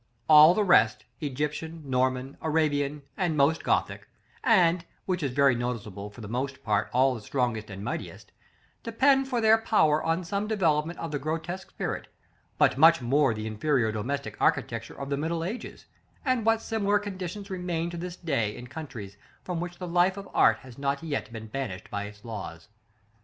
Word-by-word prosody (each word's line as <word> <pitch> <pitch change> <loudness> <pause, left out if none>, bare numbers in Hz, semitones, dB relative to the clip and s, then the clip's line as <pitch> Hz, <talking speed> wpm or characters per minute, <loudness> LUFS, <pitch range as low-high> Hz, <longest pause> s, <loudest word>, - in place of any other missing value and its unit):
All 155 +2 +9
the 215 - +2
rest 110 - +4
Egyptian, 150 +2 -4
Norman, 130 +1 0
Arabian, 150 -2 0
and 175 -5 0
most 145 +3 +3
Gothic, - - 0 0.4
and, 180 -7 +4 0.2
which 185 -2 -1
is 140 - 0
very 140 0 +4
noticeable, 110 -5 -4
for 105 +3 -13
the 105 - -7
most 130 +4 -3
part 105 -1 +1
all 130 +2 +3
the 115 - -7
strongest 115 -2 -2
and 100 0 -7
mightiest - - -6 0.5
depend 270 +4 +3
for 250 -3 -1
their 220 0 +5
power 160 -9 +3
on 165 +2 0
some 200 +4 -2
developement 170 -6 +1
of 165 - -5
the 145 - -2
grotesque 165 +5 -4
spirit; - - -4 0.5
but 130 - +3
much 165 +2 +7
more 135 0 +2
the 110 0 -5
inferior 110 +1 +1
domestic 135 +7 -3
architecture 125 -7 0
of 140 0 -5
the 140 - +1
middle 165 +3 -2
ages, 210 +8 -6 0.4
and 255 -4 +1
what 225 0 +3
similar 205 -2 +1
conditions 195 0 -6
remain 175 -2 -2
to 175 - -6
this 175 +1 -5
day 135 - -1
in 125 - -9
countries 120 -9 -8 0.3
from 180 -2 -3
which 175 0 -5
the 180 - -6
life 180 +3 +2
of 200 0 -7
art 110 - +5
has 130 0 -13
not 140 +1 -1
yet 145 -6 -3
been 110 -1 -7
banished 110 -4 -5
by 100 0 -3
its 105 +1 -12
laws. 100 -5 -7
150 Hz, 180 wpm, -27 LUFS, 120-175 Hz, 0.5 s, All